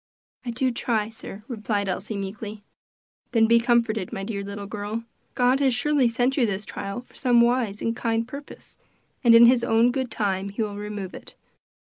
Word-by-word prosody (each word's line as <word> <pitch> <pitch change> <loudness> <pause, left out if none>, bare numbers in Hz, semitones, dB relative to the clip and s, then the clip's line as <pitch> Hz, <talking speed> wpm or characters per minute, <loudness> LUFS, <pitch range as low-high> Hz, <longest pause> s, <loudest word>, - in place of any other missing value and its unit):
"I 250 - -5
do 255 +2 0
try, 225 -3 -1
sir," 215 -2 -8
replied 215 -4 -2
Elsie 200 +3 -3
meekly. 205 +2 -6 0.7
"Then 225 -2 +5
be 235 +1 +5
comforted, 230 -4 +1
my 195 - -4
dear 200 0 -3
little 200 0 -6
girl. 210 +2 -4 0.3
God 250 +2 +3
has 265 -3 +2
surely 290 0 +2
sent 245 +4 0
you 245 -4 +3
this 200 0 -3
trial 200 +5 -5
for 250 - -25
some 245 -3 +3
wise 235 -4 +2
and 230 0 0
kind 230 -1 -1
purpose, 280 +3 -11 0.4
and 235 -2 +7
in 235 +1 +9
his 240 0 +5
own 230 +1 +4
good 260 -1 -2
time 200 -3 -1
he 205 +3 -2
will 205 -1 -4
remove 205 -2 -6
it. - - -11
225 Hz, 190 wpm, -25 LUFS, 205-245 Hz, 0.7 s, in